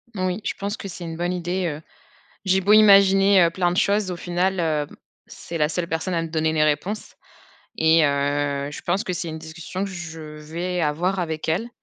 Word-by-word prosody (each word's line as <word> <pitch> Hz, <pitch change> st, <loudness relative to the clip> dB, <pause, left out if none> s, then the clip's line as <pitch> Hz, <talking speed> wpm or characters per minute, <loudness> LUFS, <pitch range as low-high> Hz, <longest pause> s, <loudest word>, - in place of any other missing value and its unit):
Oui, 185 Hz, -1 st, -1 dB
je -, -, -1 dB
pense 200 Hz, +3 st, -3 dB
que -, -, -7 dB
c'est 180 Hz, -1 st, -8 dB
une 165 Hz, -1 st, -6 dB
bonne 175 Hz, +1 st, -1 dB
idée, 180 Hz, +1 st, -2 dB
heu. 150 Hz, -1 st, -5 dB, 0.6 s
J'ai 190 Hz, 0 st, +3 dB
beau 200 Hz, +3 st, +4 dB
imaginer, 195 Hz, -2 st, +6 dB
heu, 170 Hz, -, +4 dB
plein 175 Hz, +1 st, 0 dB
de 175 Hz, -, -2 dB
choses, 200 Hz, -1 st, +2 dB
au -, -, -3 dB
final, 180 Hz, +2 st, -1 dB
heu, 155 Hz, -3 st, 0 dB, 0.4 s
c'est 170 Hz, -, -7 dB
la 150 Hz, -1 st, +2 dB
seule 170 Hz, +1 st, -2 dB
personne 165 Hz, +2 st, -2 dB
à 165 Hz, -, +1 dB
me 165 Hz, -, -4 dB
donner 160 Hz, 0 st, 0 dB
les 155 Hz, -1 st, +3 dB
réponses 155 Hz, +8 st, -2 dB, 0.6 s
et 160 Hz, 0 st, +4 dB
heu, 140 Hz, 0 st, 0 dB
je 150 Hz, -, -8 dB
pense 185 Hz, +4 st, 0 dB
que 185 Hz, -, -2 dB
c'est 175 Hz, -1 st, -4 dB
une 160 Hz, 0 st, -5 dB
discussion 165 Hz, +4 st, -6 dB
que 200 Hz, -, -5 dB
je 165 Hz, -3 st, -7 dB
vais 160 Hz, +4 st, -5 dB
avoir 170 Hz, +5 st, 0 dB
avec 160 Hz, -3 st, -4 dB
elle. 185 Hz, +9 st, 0 dB
175 Hz, 215 wpm, -23 LUFS, 160-190 Hz, 0.6 s, imaginer